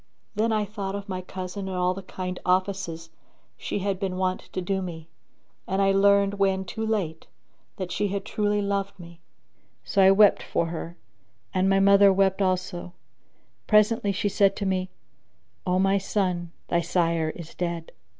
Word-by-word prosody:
Then 225 +2 +1
I 215 -1 +1
thought 200 -1 -5
of 200 0 -6
my 185 -2 -4
cousin 185 +1 -6
and 185 - -4
all 180 0 +2
the 195 - -7
kind 180 -1 -5
offices 180 -3 -1 0.4
she - - -4
had 195 -2 -1
been 190 -2 -2
wont 185 0 -2
to - - -3
do 190 +1 -1
me, 165 -3 -7 0.6
and 190 - -1
I 195 0 +4
learned 200 0 +3
when 190 -1 +1
too 220 +4 -5
late 195 -8 -2 0.5
that 185 -2 -4
she 205 - 0
had 200 0 -3
truly 210 -1 0
loved 200 -1 -2
me; 170 -1 -12 0.6
so 200 - +1
I 190 - +7
wept 205 +1 +6
for - - -1
her 170 +1 -6 0.6
and 190 0 +2
my 195 0 +4
mother 200 0 +6
wept 195 0 +2
also 180 -2 -1 0.7
Presently 210 -1 +3
she 205 +2 -1
said 195 0 +3
to 205 - -3
me, 185 -1 -1 0.8
"O 180 0 +2
my 195 +1 +3
son, 180 -4 -1 0.2
thy 170 - +2
sire 165 -2 +1
is 170 -2 -9
dead." 170 -2 -4
190 Hz, 170 wpm, -26 LUFS, 180-200 Hz, 0.8 s, I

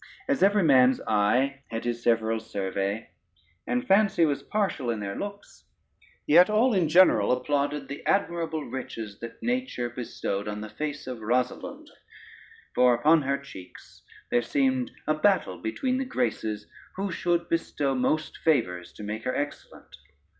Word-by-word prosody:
As 275 -1 0
every 200 0 +4
man's 130 -4 +5
eye 125 +7 +1
had 115 0 -4
his 120 0 -2
several 115 -1 +1
survey, 100 0 -3 0.6
and 125 0 -1
fancy 195 -2 +4
was 145 -3 -1
partial 195 - -1
in 115 -2 -1
their 100 -1 -4
looks, 200 0 -8 0.6
yet 175 +6 +6
all 225 +4 +3
in 180 -6 +2
general 165 - +5
applauded 140 +2 -1
the 140 +1 -7
admirable 165 -5 0
riches 115 -5 -6
that 115 - -9
nature 245 - -2
bestowed 105 -4 -4
on 105 0 -4
the 110 - -7
face 150 +2 -5
of 125 -2 -6
Rosalynde; 125 +3 -2 0.8
for 125 -1 +5
upon 155 +6 +4
her 140 0 0
cheeks 95 -11 -13 0.3
there 120 - +3
seemed 130 +1 0 0.2
a 155 - +2
battle 155 - +1
between 255 - -1
the 265 - -1
Graces, 110 - -2 0.3
who 195 0 -3
should 170 0 0
bestow 145 -4 -1
most 135 +5 -1
favors 90 - 0
to - - -10
make 105 +2 -5
her 130 - -1
excellent. 145 0 -6
135 Hz, 150 wpm, -27 LUFS, 115-170 Hz, 0.8 s, yet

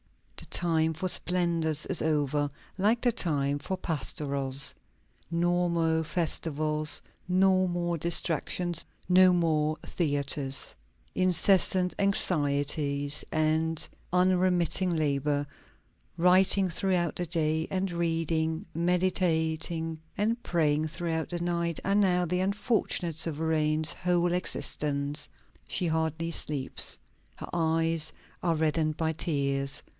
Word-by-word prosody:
The - - -5
time 160 -2 +3
for 160 +4 -3
splendors 170 -4 +1
is 185 - 0
over, 145 -2 0 0.3
like 215 +5 +1
the 245 - +2
time 145 -8 -1
for 185 +6 -4
pastorals. 140 -4 -1 0.6
No 175 +1 +1
more 165 -1 +1
festivals, 155 -2 +2 0.3
no 185 0 +3
more 175 -1 -2
distractions, 170 +1 +1 0.2
no 185 0 +6
more 155 -3 +1
theatres. 140 -3 -1 0.4
Incessant 185 0 +3
anxieties 145 -6 0
and 155 +1 0 0.2
unremitting 180 -1 +2
labor; 145 -1 0 0.7
writing 185 +2 +4
throughout 175 -1 -1
the 175 - -3
day 160 -1 0
and 190 0 -1
reading, 165 0 -1
meditating, 165 -2 0 0.2
and 225 +3 0
praying 155 -2 +1
throughout 160 0 -3
the 175 - -4
night, 170 -1 -1
are 195 +1 +1
now 180 -3 +2
the 180 +2 -1
unfortunate 200 - -1
sovereign's 155 -1 0
whole 175 -1 0
existence. 145 -4 -1 0.4
She 180 - -1
hardly 160 +1 -1
sleeps. 145 -5 +3 0.4
Her - - -9
eyes 165 -1 0 0.3
are 170 -2 +1
reddened 155 0 0
by 160 0 -1
tears. 140 -3 -1
165 Hz, 105 wpm, -28 LUFS, 155-180 Hz, 0.7 s, no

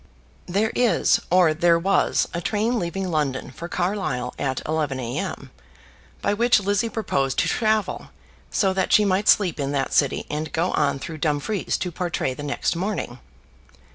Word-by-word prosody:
There 205 +5 +1
is, 245 -2 +3
or 175 -3 +5
there 170 +1 +3
was, 195 +4 +2
a 170 - -2
train 225 +6 0
leaving 185 +1 -3
London 140 -5 -1
for 170 +6 -7
Carlisle 175 -11 -2
at 130 -2 -1
11 150 -4 -1
a.m., 120 -1 -4 0.7
by - - +2
which 235 +2 +4
Lizzie 205 +3 0
proposed 140 - -1
to - - +2
travel, 215 -4 0 0.4
so 190 -2 +1
that 190 -1 -1
she 210 - +5
might 200 +1 +1
sleep 185 -7 +3
in 140 0 -2
that 135 -1 -1
city 140 -3 +2
and 155 +1 -4
go 170 +3 0
on - - +1
through 160 +2 -7
Dumfries 155 +7 -1
to 180 - -3
Portray 170 -6 -2
the 135 - -8
next 145 +3 -1
morning. 180 - -3
175 Hz, 165 wpm, -23 LUFS, 145-205 Hz, 0.7 s, or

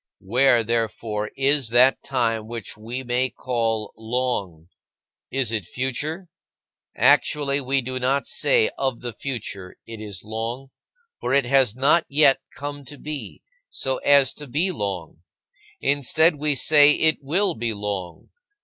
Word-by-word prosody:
Where, 120 +3 +3
therefore, 110 -2 -2
is 135 -2 +2
that 125 +3 +4
time 115 -4 -1
which 115 -3 -6
we 115 +5 -6
may 125 +1 0
call 115 -3 -2
"long"? 110 -8 -3 0.6
Is 130 -4 0
it 110 -4 -1
future? 140 - -4 0.7
Actually 140 -1 +3
we 135 0 0
do 130 +1 -3
not 135 +2 0
say 460 -2 +2
of 130 -3 -1
the 120 -2 -5
future, 105 -9 -6
"It 115 -1 -9
is 100 -4 -8
long," 115 +5 -5 0.5
for - - 0
it 140 -2 +3
has 130 -3 +3
not 145 +6 +3
yet 140 -2 +4 0.2
come 145 0 -6
to 145 +2 -11
be, 150 -1 -7 0.3
so 130 -1 -2
as 140 -2 +4
to 145 - -10
be 160 +9 0
long. 95 - -5 0.6
Instead, 145 +4 +2
we 150 0 +1
say, 150 +1 +6
"It 160 +1 +2
will 175 +9 +1
be 115 0 -2
long." 100 -5 -5
130 Hz, 140 wpm, -23 LUFS, 115-140 Hz, 0.7 s, say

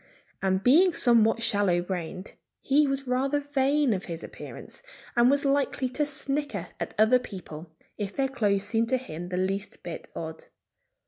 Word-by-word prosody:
And 190 0 +1
being 335 - +5
somewhat 230 -4 +4
shallow 200 -5 +2
brained, 180 +1 -5 0.3
he 290 +2 +3
was 275 0 -1
rather 265 +3 +1
vain 285 -2 +1
of 190 -1 -4
his 170 -2 -6
appearance, - - -9 0.3
and 240 +1 +5
was 285 +1 +2
likely 275 -1 +1
to 295 +4 -1
snicker 280 - -2
at - - -5
other 220 +4 +5
people 175 -8 -9 0.3
if 200 -1 -4
their 270 -1 +1
clothes 205 -7 0
seemed 225 +2 0
to 260 - +2
him 175 -9 -7
the 180 - -3
least 195 +2 -3
bit - - -7
odd. 485 - -6
240 Hz, 165 wpm, -27 LUFS, 195-275 Hz, 0.3 s, being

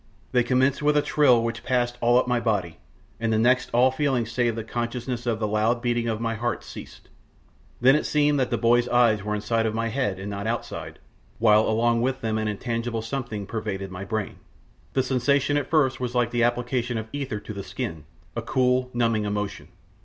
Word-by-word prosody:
They 125 - +4
commenced 130 +3 +2
with 150 0 +3
a 145 - +3
thrill 130 -7 +4
which 115 0 -3
passed 120 -1 0
all 120 +1 +4
up 125 - +2
my 125 -1 +1
body, 100 -8 -1 0.4
and 115 - -1
next 125 +1 +3
all 125 +2 +4
feeling 130 -3 0
save 115 0 0
the 115 - -4
consciousness 120 +2 -4
of 115 -2 +1
the 110 - 0
loud 110 +3 +1
beating 120 -1 0
of 110 -2 -1
my 115 0 -1
heart 115 0 -2
ceased. - - -11 0.7
Then 130 +3 +6
it 150 - 0
seemed 145 -1 +2
that 130 - +1
boy's 120 +1 +3
eyes 115 -4 +4
were 105 0 -2
inside 110 +1 0
my 115 0 -1
head 105 -6 -1
and 95 +2 -6
not 100 +1 -4
outside, 120 +1 -4 0.4
while 110 -1 +4
along 115 +1 +2
with 130 +2 -1
them 110 -1 -1
an 110 - -1
intangible 115 +2 -3
something 115 -4 -4
pervaded 100 -3 -4
my 90 +1 -6
brain. 110 +1 -3 0.6
The 130 - +2
sensation 135 +2 +1
at 145 -2 -1
first 145 -5 +2
was 125 -1 -3
like 120 -1 +2
the 120 - 0
application 120 0 -1
of 110 0 -4
ether 135 -7 -3
to 105 - -8
the 100 - -5
skin 80 -4 -5 0.3
a - - -2
cool, 125 0 +1
numbing 115 -3 +1
emotion. 105 -1 -3
120 Hz, 200 wpm, -25 LUFS, 110-125 Hz, 0.7 s, Then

